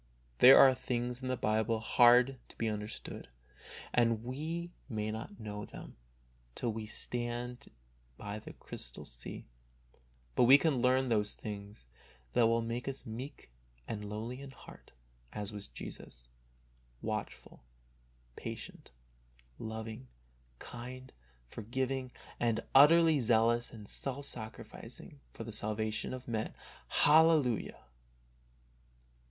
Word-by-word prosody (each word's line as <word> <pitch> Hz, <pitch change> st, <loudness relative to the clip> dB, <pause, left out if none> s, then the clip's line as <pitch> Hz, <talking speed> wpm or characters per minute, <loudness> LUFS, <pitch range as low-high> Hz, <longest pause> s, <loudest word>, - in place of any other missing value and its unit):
There 130 Hz, +2 st, +10 dB
are 135 Hz, -1 st, +9 dB
things 125 Hz, 0 st, -3 dB
in 130 Hz, -, -4 dB
the 130 Hz, 0 st, 0 dB
Bible 110 Hz, +1 st, +1 dB
hard 125 Hz, +3 st, +5 dB
to -, -, -17 dB
be 115 Hz, -, 0 dB
understood, 105 Hz, 0 st, -5 dB, 0.7 s
and 115 Hz, -2 st, +3 dB
we 160 Hz, +7 st, -4 dB, 0.2 s
may 110 Hz, -2 st, -2 dB
not 115 Hz, -, -7 dB
know 105 Hz, -1 st, -5 dB
them -, -, -10 dB, 0.6 s
till 115 Hz, -2 st, -1 dB
we 110 Hz, 0 st, -5 dB
stand 120 Hz, +2 st, -2 dB, 0.5 s
by 105 Hz, +1 st, -5 dB
the -, -, -10 dB
crystal -, -, -7 dB
sea, -, -, -9 dB, 0.9 s
but 120 Hz, -, +4 dB
we 135 Hz, +3 st, +10 dB
can 145 Hz, -5 st, +1 dB
learn 130 Hz, +1 st, +3 dB
those 105 Hz, -2 st, +1 dB
things 100 Hz, -, -8 dB, 0.5 s
that 120 Hz, -2 st, +5 dB
will 115 Hz, 0 st, +2 dB
make 115 Hz, +2 st, -4 dB
us 135 Hz, 0 st, -5 dB
meek 120 Hz, -, -8 dB, 0.4 s
and 105 Hz, -2 st, -4 dB
lowly 115 Hz, +5 st, -5 dB
in 140 Hz, -, -8 dB
heart 135 Hz, -, -14 dB, 0.4 s
as 105 Hz, 0 st, -4 dB
was 100 Hz, -1 st, -6 dB
Jesus, -, -, -9 dB, 0.8 s
watchful, -, -, -5 dB, 0.7 s
patient, -, -, -8 dB, 0.7 s
loving, 110 Hz, -, -6 dB, 0.5 s
kind, 125 Hz, -, -9 dB, 0.3 s
forgiving, 130 Hz, -, -3 dB, 0.3 s
and 115 Hz, -2 st, +1 dB
utterly 160 Hz, +2 st, +7 dB
zealous 120 Hz, 0 st, +3 dB
and 105 Hz, -3 st, -10 dB
self 140 Hz, +5 st, -3 dB
sacrificing 115 Hz, +3 st, -7 dB
for -, -, -7 dB
the 115 Hz, -, -7 dB
salvation 110 Hz, 0 st, -2 dB
of 130 Hz, 0 st, -7 dB
men. 110 Hz, -2 st, -2 dB, 0.3 s
Hallelujah 150 Hz, -, +4 dB
120 Hz, 120 wpm, -33 LUFS, 110-130 Hz, 0.9 s, There